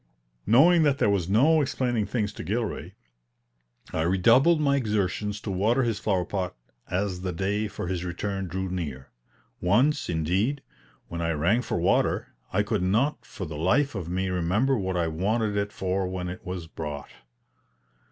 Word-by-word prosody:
Knowing 160 - +6
that 145 -3 +3
there 105 - +3
was 95 -3 0
no 150 +10 +5
explaining 120 -5 0
things 105 -4 -1
to - - -7
Gilray, 110 +2 -3 1.0
I 80 - 0
redoubled 115 - +4
my 140 -2 +3
exertions 105 -4 -1
to 100 - -4
water 110 +8 +2
his 115 -3 -1
flower 95 -4 0
pot 90 -1 -3 0.3
as 95 0 -1
the 95 -1 -2
day 100 +5 -1
for 100 - -6
his 90 -1 -2
return 95 +2 -3
drew 95 +2 -3
near. 75 -8 -5 0.5
Once, 125 - +2
indeed, 95 - 0 0.4
when 85 0 -5
I 85 0 0
rang 90 +11 +2
for - - -2
water, - - +1 0.2
I 105 +2 +2
could 105 -2 -1
not 110 +11 +1
for 95 - -6
the 80 -2 -6
life 135 - +2
of 90 -6 -5
me 95 +2 -1
remember 95 +10 +1
what 95 -5 -1
I 85 -1 +1
wanted 105 +6 0
it 100 0 -1
for 95 -1 -1
when 90 -1 -4
it 90 - -8
was 90 -2 -5
brought. 75 -3 -6
95 Hz, 170 wpm, -26 LUFS, 90-115 Hz, 1.0 s, Knowing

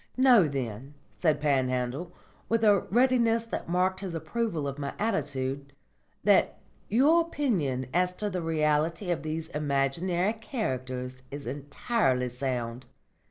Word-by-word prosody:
"Know, 250 -9 +6
then," 135 0 -5 0.2
said 155 -4 +1
Panhandle, 130 +2 0 0.4
with 230 0 +1
a 205 -2 +6
readiness 235 -1 +3
that 230 - -5
marked 185 +2 +1
his 190 -4 -5
approval 170 -4 -2
of 140 +1 -5
my 140 -1 -4
attitude, 140 -9 -2 0.5
"that - - +4 0.3
your 285 +10 +5
opinion 195 - -1
as 180 +1 +2
to 210 - -3
the 185 -3 -2
reality 160 +3 +1
of 165 -5 -1
these 155 +1 -4
imaginary 150 +7 0
characters 130 - -4
is 145 0 -7
entirely 140 - 0
sound. 125 -1 -3
155 Hz, 125 wpm, -28 LUFS, 135-210 Hz, 0.5 s, Know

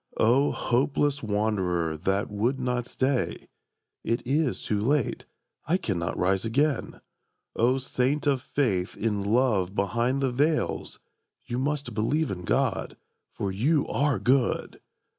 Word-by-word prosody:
O 130 +6 +4
hopeless 140 +3 +1
wanderer 95 -6 0
that 95 +6 -1
would 120 +6 0
not 125 -1 -1
stay, 130 -1 -1 0.6
("It 115 +1 -1
is 140 +1 0
too 105 -1 -1
late, 135 +2 0 0.4
I 170 +4 +3
cannot 85 - -2
rise 95 +1 +1
again!") 135 +5 0 0.5
O 125 +3 +3
saint 130 +2 -1
of 140 -3 +2
faith 105 -10 -1
in 105 -2 -1
love 100 -3 +1
behind 120 +7 0
the 130 - +1
veils, 150 +5 0 0.5
("You 120 - -3
must 145 -2 -2
believe 140 +8 0
in 90 -2 -5
God, - - 0 0.3
for 100 - -3
you 140 +10 +1
are 140 -3 +1
good!") 125 +5 +1
120 Hz, 130 wpm, -27 LUFS, 100-140 Hz, 0.6 s, O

